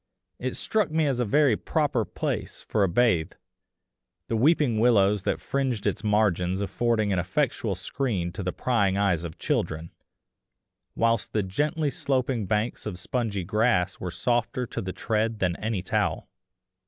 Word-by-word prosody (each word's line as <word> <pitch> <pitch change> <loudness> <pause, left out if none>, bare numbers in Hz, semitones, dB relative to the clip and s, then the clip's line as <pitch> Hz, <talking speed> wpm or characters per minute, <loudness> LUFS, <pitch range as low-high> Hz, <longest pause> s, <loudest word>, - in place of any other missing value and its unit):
It - - -3
struck 215 -6 0
me 160 0 +1
as 135 -4 0
a 125 - +2
very 135 +2 +4
proper - - 0
place - - -3
for 105 - 0
a 95 - +2
bathe, 90 -4 +2 1.0
the 115 - 0
weeping 135 -2 +3
willows 105 -4 +4
that - - -1
fringed 130 -6 -2
its - - -1
margins 95 -4 +2
affording 110 0 0
an 90 - +1
effectual 100 - -1
screen 95 -3 -2
to 100 - -6
the 90 -1 -1
prying 100 -6 +1
eyes 95 -5 +1
of 80 -2 -7
children; 80 +1 -2 1.0
whilst 115 -1 +1
the 105 - +1
gently 150 - 0
sloping 130 -7 -1
banks 105 +3 -1
of 95 -4 -4
spongy 105 0 -2
grass 105 -2 +1
were 90 - -4
softer 120 +4 0
to - - -5
the 95 - -4
tread 110 +2 -1
than 90 -4 0
any 110 -4 -2
towel. - - -1
110 Hz, 155 wpm, -26 LUFS, 95-125 Hz, 1.0 s, very